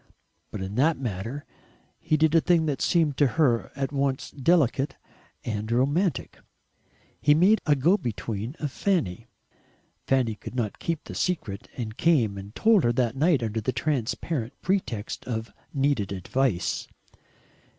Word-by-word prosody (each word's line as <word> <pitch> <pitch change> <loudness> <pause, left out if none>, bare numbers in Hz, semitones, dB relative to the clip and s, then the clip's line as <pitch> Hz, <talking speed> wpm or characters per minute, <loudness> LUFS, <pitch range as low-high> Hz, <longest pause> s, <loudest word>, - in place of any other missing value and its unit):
But 100 - -5
in 95 +1 -5
that 155 +5 +3
matter 120 +3 -4 0.5
he 155 - +1
did 155 0 +3
a 165 - +6
thing 170 -2 +3
that 145 -3 -2
seemed 160 -6 +2
to 145 - +5
her 125 -8 +2
at 135 -1 -2
once 140 -2 -1
delicate 140 -2 +2 0.5
and 110 0 -3
romantic. 145 +6 0 0.8
He 145 0 +5
made 195 +7 +4
a 150 - +5
go 165 +9 +3
between 115 - -4
of 145 -3 -3
Fanny. 115 - -1 0.8
Fanny 130 -4 +2
could 105 - -9
not 115 -5 -2
keep 165 -2 -2
the - - -9
secret, 115 - -2
and 110 -3 -5
came 125 -12 +3
and 100 +3 -11
told 220 -6 +4
her 120 - +3
that 120 -1 0
night 150 -2 +3
under 110 0 -1
a 130 - 0
transparent 130 0 -2
pretext 125 - -2
of 115 -2 -4 0.2
needed 135 -8 0
advice. 100 +1 -1
135 Hz, 150 wpm, -26 LUFS, 115-155 Hz, 0.8 s, a